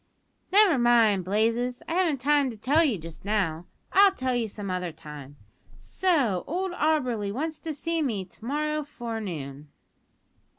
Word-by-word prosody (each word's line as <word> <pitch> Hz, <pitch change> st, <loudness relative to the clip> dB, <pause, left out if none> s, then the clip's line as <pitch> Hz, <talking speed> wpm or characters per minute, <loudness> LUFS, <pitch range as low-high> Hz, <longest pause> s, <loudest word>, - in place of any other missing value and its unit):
"Never 390 Hz, -8 st, +5 dB
mind, 230 Hz, -5 st, +4 dB
Blazes. 230 Hz, +5 st, 0 dB
I -, -, -3 dB
haven't 335 Hz, -7 st, +1 dB
time 290 Hz, 0 st, +3 dB
to 230 Hz, -, -8 dB
tell 290 Hz, +9 st, +3 dB
you 260 Hz, -10 st, +1 dB
just 165 Hz, -1 st, -10 dB
now. 185 Hz, -5 st, -1 dB, 0.3 s
I'll 395 Hz, 0 st, +7 dB
tell 255 Hz, -7 st, -1 dB
you 235 Hz, -2 st, 0 dB
some 200 Hz, -2 st, -6 dB
other 180 Hz, -1 st, -2 dB
time. 150 Hz, -3 st, -11 dB, 0.4 s
So 240 Hz, -, 0 dB
old 370 Hz, +4 st, -2 dB
Auberly 255 Hz, -, 0 dB
wants 310 Hz, +7 st, -3 dB
to 325 Hz, -, -5 dB
see 330 Hz, +2 st, -2 dB
me 220 Hz, -10 st, -1 dB
to 180 Hz, -, -19 dB
morrow 300 Hz, +4 st, -1 dB
forenoon?" 195 Hz, -, -6 dB
240 Hz, 155 wpm, -26 LUFS, 195-305 Hz, 0.4 s, I'll